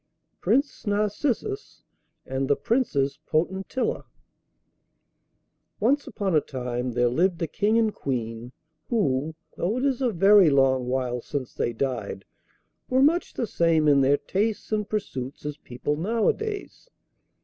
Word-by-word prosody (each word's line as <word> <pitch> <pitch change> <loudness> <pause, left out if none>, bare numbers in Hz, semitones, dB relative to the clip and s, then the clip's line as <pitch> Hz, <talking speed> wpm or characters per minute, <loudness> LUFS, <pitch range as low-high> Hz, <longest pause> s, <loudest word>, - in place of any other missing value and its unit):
PRINCE 275 -4 0
NARCISSUS 235 - -1 0.4
AND 135 +1 -2
THE 145 - +3
PRINCESS 140 - 0
POTENTILLA 190 +9 -1 1.7
Once 280 +7 +2
upon 195 -5 -1
a 155 - +5
time 125 -2 -4
there 120 +1 +3
lived 170 +8 +1
a - - +2
King 210 +7 +1
and 220 -2 +2
Queen 120 -2 -4 0.4
who, 160 - 0 0.2
though 205 +7 0
it 255 - 0
is 270 -2 0
a 255 - +3
very 195 -2 +6
long 135 -2 +3
while 125 -1 -1
since 135 -2 -5
they - - -1
died, 115 -5 -3 0.6
were 260 +1 +4
much 335 +5 +2
the 240 - -1
same 165 -6 +2
in 140 -2 +5
their 140 +2 +4
tastes 210 +7 -2
and 210 -1 -1
pursuits 145 -12 -4
as 150 0 -4
people 125 +2 -3
nowadays. 235 - -2
165 Hz, 135 wpm, -25 LUFS, 130-220 Hz, 1.7 s, very